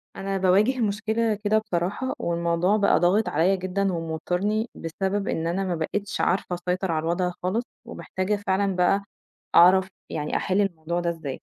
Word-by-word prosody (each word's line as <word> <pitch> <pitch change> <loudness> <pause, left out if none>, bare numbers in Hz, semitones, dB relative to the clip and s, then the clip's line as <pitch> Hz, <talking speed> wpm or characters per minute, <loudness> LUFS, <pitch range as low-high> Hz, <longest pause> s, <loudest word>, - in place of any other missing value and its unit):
أنا 195 0 -3
باواجِه 200 +7 +3
مشكلة 220 +1 0
كده 215 +1 +3
بصراحة 205 +4 -2
والموضوع 170 +3 +1
بقى 200 -1 +3
ضاغط 195 +5 +2
عليّا 185 +4 +2
جدًا 190 +1 -1
وموتّرني، 180 +7 -1
بسبب 195 +5 -2
إن 165 0 -1
أنا 180 +3 -1
ما 180 -2 -1
بقيتش 195 +5 -3
عارفة 180 0 0
أسيطر 180 +1 -2
على 155 -1 -1
الوضع 175 +2 0
خالص 200 +6 0 0.2
ومحتاجة 210 -3 -3
فعلًا 190 0 +1
بقى 190 +2 +2 0.5
أعرف 185 +2 +7 0.2
يعني 150 -1 -3
أحِل 195 +2 +1
الموضوع 170 -3 -2
ده 175 -1 -1
إزاي. 160 -6 -5
185 Hz, 155 wpm, -25 LUFS, 170-205 Hz, 0.5 s, أعرف